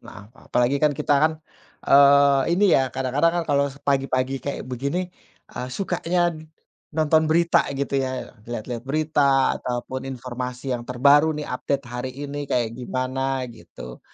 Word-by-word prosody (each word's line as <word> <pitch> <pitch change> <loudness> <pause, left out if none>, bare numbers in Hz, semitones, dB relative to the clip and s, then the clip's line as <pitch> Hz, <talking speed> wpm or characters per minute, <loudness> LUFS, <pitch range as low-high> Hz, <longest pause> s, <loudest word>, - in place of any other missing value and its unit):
Maaf 100 - -12
maaf. - - -19
Apalagi 125 +3 +2
kan 150 - +5
kita 145 +1 -1
kan, 160 0 +4 0.5
eee, 140 0 +6
ini, 200 - +2
ya, 130 -2 +2
kadang-kadang 135 +5 +1
kan - - -8
kalau 140 -1 +3
se 140 - -16
pagi-pagi 135 -1 0
kayak 140 - -4
begini, 140 +8 -3 0.5
eee, 125 +1 -5
sukanya 175 -2 0 0.6
nonton 155 0 +3
berita, 170 +1 +4 0.2
gitu, 140 0 -2
ya, 130 -1 -5
lihat-lihat 120 0 -5
berita 140 -2 +2
atau 125 -1 -3
pun 130 0 -4
informasi 125 0 -5
yang 120 - -4
terbaru, 140 +5 +4
nih, 150 - -5
update 140 +2 -2
hari 125 +1 -5
ini 145 +2 -5
kayak 115 -2 0
gimana, 130 +1 -2
gitu. 85 - -12
135 Hz, 155 wpm, -23 LUFS, 125-145 Hz, 0.6 s, eee